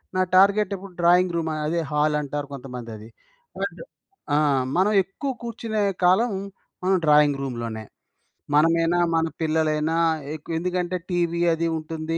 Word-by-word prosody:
నా 185 - +2
టార్గెటెప్పుడు 195 0 +3
drawing 175 +1 +4
room 160 -1 -1 0.2
అదే 165 +3 0
హాలంటారు 150 -1 0
కొంతమందది. 120 -4 -8 0.5
And - - -4 0.5
ఆ! - - +4 0.4
మనం 195 +3 +3
ఎక్కువ 265 +9 -5
కూర్చునే 225 -2 -3 0.2
కాలం 205 +6 +4 0.5
మనం 190 +1 +3
డ్రాయింగ్ 150 -1 +5
రూమ్‌లోనే. 115 -4 -4 0.7
మనమేనా, 165 +3 +3 0.2
మన 165 0 +2 0.2
పిల్లలైనా 155 0 +1 0.4
ఎక్కువెందుకంటే 175 +3 -3
టీవీ 170 -1 0
అది 165 +1 -1
ఉంటుంది. 160 +1 -4
165 Hz, 115 wpm, -24 LUFS, 150-185 Hz, 0.7 s, డ్రాయింగ్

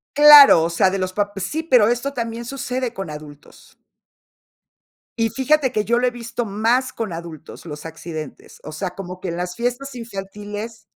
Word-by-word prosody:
Claro, 290 - +9
o 165 - 0
sea, 170 +2 +2
de 195 - -2
los 185 0 -3
pap 205 0 -2
sí, 195 - -3
pero 250 -9 +4
esto 245 +4 -1
también 230 -2 -4
sucede 255 -1 -4
con 195 -5 -6
adultos. 150 -1 -12 1.4
Y 225 - +2
fíjate 265 +2 +1
que 215 -3 0
yo 235 +2 +1
lo 250 - +1
he - - +2
visto 240 -1 -5
más 230 +6 0
con 220 -6 -4
adultos, 165 -1 -9
los 150 -2 -8
accidentes, 160 -2 -9
o 155 - -8
sea, 180 +4 -4
como 180 -1 -8
que 185 - -5
en 170 - -4
las 180 0 -4
fiestas 245 +3 -3
infantiles 210 0 -7
215 Hz, 180 wpm, -21 LUFS, 180-245 Hz, 1.4 s, Claro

